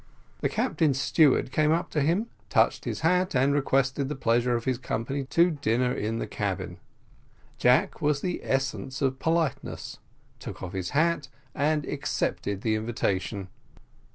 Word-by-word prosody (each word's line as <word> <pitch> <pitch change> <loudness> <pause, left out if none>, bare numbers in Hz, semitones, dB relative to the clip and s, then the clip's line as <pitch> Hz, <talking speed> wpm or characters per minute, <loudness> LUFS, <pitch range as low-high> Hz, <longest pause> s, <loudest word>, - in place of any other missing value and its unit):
The - - 0
captain's 145 -5 +1
steward 140 -3 +3
came 155 +2 +2
up 165 +2 0
to 150 - +1
him, 170 +10 +2 0.2
touched - - +2
his - - -3
hat, 180 +1 +2
and 135 +2 +3
requested 135 -1 +1
the 150 - -3
pleasure 120 -1 +2
of 115 - -3
his 130 -2 0
company 135 +3 -3
to 170 +6 +3
dinner 125 -4 0
in 110 +2 -2
the - - -2
cabin. - - -4 0.8
Jack 130 +11 +3
was 150 -1 +2
the 180 -1 -2
essence 135 +1 -2
of 130 -1 0
politeness, 160 -5 -1 0.4
took - - -8
off 95 0 -6
his 95 -2 -3
hat, 160 -2 +2 0.3
and 150 +1 +1
accepted 100 -7 -2
the 110 -1 +1
invitation. 105 -3 -2
135 Hz, 155 wpm, -27 LUFS, 120-155 Hz, 0.8 s, steward